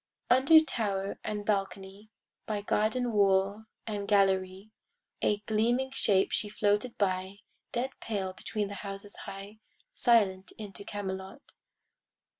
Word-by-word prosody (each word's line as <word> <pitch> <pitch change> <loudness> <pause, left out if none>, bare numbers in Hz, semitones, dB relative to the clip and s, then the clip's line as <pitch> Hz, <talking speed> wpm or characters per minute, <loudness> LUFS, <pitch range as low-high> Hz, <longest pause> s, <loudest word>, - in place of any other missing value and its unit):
Under 270 +6 +8
tower 200 -9 -2
and 210 -1 -3
balcony, 195 0 -2 0.4
By 210 -2 -2
garden 230 +4 +1
wall 200 0 +2 0.2
and 205 -2 -4
gallery, 195 0 +2 0.5
A 205 0 +1
gleaming 235 +5 +1
shape 200 -7 +2
she 210 - -1
floated 210 +3 0
by, 190 0 -1 0.3
Dead 250 +2 -1
pale 195 -4 -3
between 210 +2 -3
the - - -6
houses 200 0 -7
high, 200 +2 -8 0.3
Silent 200 - +2
into 205 -2 -7
Camelot. 195 +5 -6
205 Hz, 115 wpm, -30 LUFS, 195-220 Hz, 0.5 s, Under